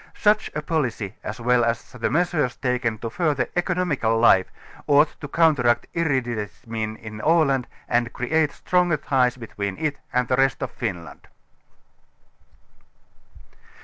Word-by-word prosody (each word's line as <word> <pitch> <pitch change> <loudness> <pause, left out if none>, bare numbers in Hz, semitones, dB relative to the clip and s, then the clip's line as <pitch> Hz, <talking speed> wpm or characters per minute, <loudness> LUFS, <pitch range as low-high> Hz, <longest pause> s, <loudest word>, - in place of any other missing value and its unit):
Such 210 +1 +2
a 150 - -3
policy 125 - -2
as 105 - -6
well 120 +1 +3
as 115 0 -2
the 125 -2 -2
measures 165 -6 +1
taken 125 -3 -1
to 115 +2 -5
further 150 -5 0
economical 175 - 0
life 95 -5 +5 0.4
ought 145 +2 +5
to 145 - -5
counteract 145 -7 +3
irri 150 -6 +1
dentism 110 0 -5
in 110 -1 -8
Aland 150 -5 +2 0.2
and 120 -1 +1
create 150 +4 0
stronger 180 -3 +1
ties 130 -3 +1
between 100 -4 -5
it 150 -2 -2
and 125 -1 +1
the 125 - +1
rest 135 +1 +2
of 125 - -4
Finland. 90 -9 -6
125 Hz, 135 wpm, -23 LUFS, 115-155 Hz, 0.4 s, life